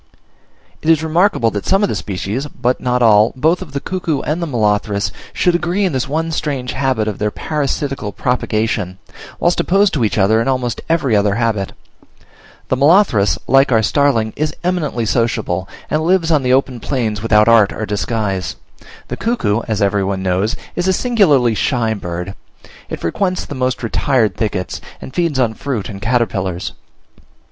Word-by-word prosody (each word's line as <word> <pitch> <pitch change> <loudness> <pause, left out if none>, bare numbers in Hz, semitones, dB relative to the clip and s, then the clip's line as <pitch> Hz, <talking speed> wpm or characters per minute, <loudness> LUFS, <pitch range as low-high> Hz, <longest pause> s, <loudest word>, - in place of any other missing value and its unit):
It 160 - -1
is 160 -1 +4
remarkable 160 - +2
that 105 -1 -4
some 195 +2 +3
of 205 - +2
the - - -1
species, 105 +8 -3
but 125 -3 -1
not 125 0 +1
all, 110 -1 +5
both 160 +8 +1
of 175 -6 -8
the 140 - -1
Cuckoo 165 -3 -2
and 155 +4 -2
Molothrus, 105 - 0 0.2
should 180 - +1
agree 175 +3 0
in 180 - 0
this 130 +1 -1
one 160 +3 -1
strange 140 -5 -2
habit 130 -5 0
of 105 - -3
their 105 - +1
parasitical 140 -4 -3
propagation, 110 -6 -1 0.4
whilst 175 - +2
opposed 195 +2 +3
to 135 - 0
each 110 - 0
other 110 +3 +3
in 115 - -2
almost 130 -2 -1
every 150 -8 +2
other 100 -1 +2
habit: 110 -4 -1 1.0
the - - +2
molothrus, 140 - +4
like 135 +1 +4
our 110 -2 +3
starling, 115 -3 +2
is 155 0 -2
eminently 155 -10 -1
sociable, 105 -6 -1 0.2
and 155 - 0
lives 170 0 +2
on 150 -3 +4
the 125 -1 0
open 130 -1 +1
plains 110 -4 -2
without 105 -1 +4
art 115 -4 +5
or 110 - -4
disguise: 105 -2 -2 0.5
the - - -5
cuckoo, 120 - 0
as 110 -2 0
every 100 0 +1
one 95 0 -2
knows, 95 +6 0 0.2
is 175 +1 -1
a 190 - +3
singularly 175 - +3
shy 115 0 0
bird; 90 -1 -5 0.6
it - - -5
frequents 185 - -1
the - - -7
most 130 -2 -2
retired 115 -3 +1
thickets, 100 -5 -3 0.2
and - - -10
feeds 170 -5 0
on 120 -4 +2
fruit 120 -4 -4
and 100 -2 -8
caterpillars. 100 -7 -1
125 Hz, 170 wpm, -17 LUFS, 105-155 Hz, 1.0 s, all